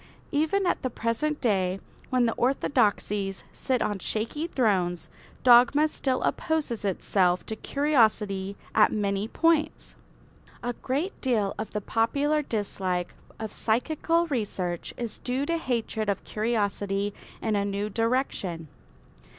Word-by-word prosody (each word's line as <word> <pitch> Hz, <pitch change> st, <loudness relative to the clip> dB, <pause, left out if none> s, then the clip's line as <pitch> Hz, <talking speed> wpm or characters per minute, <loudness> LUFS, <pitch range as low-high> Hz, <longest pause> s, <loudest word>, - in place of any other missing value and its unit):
Even 320 Hz, +6 st, +1 dB
at -, -, +1 dB
the 255 Hz, -, -1 dB
present 245 Hz, +7 st, -1 dB
day, 190 Hz, -5 st, +1 dB, 0.3 s
when 250 Hz, -1 st, +3 dB
the 230 Hz, -, +1 dB
orthodoxies 210 Hz, -6 st, +1 dB
sit 255 Hz, -2 st, 0 dB
on 205 Hz, -2 st, -2 dB
shaky 230 Hz, -, -2 dB
thrones, 190 Hz, -, 0 dB, 0.3 s
dogma 250 Hz, +5 st, +7 dB
still 265 Hz, -4 st, -1 dB
opposes 305 Hz, -9 st, -1 dB
itself 185 Hz, -2 st, +1 dB
to 220 Hz, -, -4 dB
curiosity 215 Hz, -9 st, +1 dB, 0.2 s
at 215 Hz, -, +5 dB
many 200 Hz, -1 st, 0 dB
points. 330 Hz, +4 st, +1 dB, 0.7 s
A 245 Hz, 0 st, -1 dB
great 285 Hz, +11 st, -3 dB
deal 220 Hz, -7 st, +1 dB
of 215 Hz, -, -3 dB
the 210 Hz, -, -1 dB
popular 280 Hz, +9 st, +1 dB
dislike 190 Hz, -7 st, -2 dB, 0.2 s
of 220 Hz, -1 st, -5 dB
psychical 315 Hz, +8 st, +1 dB
research 195 Hz, -, -3 dB
is 235 Hz, -2 st, -5 dB
due 260 Hz, +3 st, -1 dB
to 335 Hz, +2 st, 0 dB
hatred 230 Hz, -6 st, -1 dB
of 200 Hz, -, -1 dB
curiosity 205 Hz, -2 st, -1 dB, 0.3 s
in 220 Hz, -2 st, 0 dB
a 200 Hz, -, +1 dB
new 200 Hz, +1 st, -2 dB
direction. 215 Hz, -, -1 dB
225 Hz, 125 wpm, -27 LUFS, 200-270 Hz, 0.7 s, dogma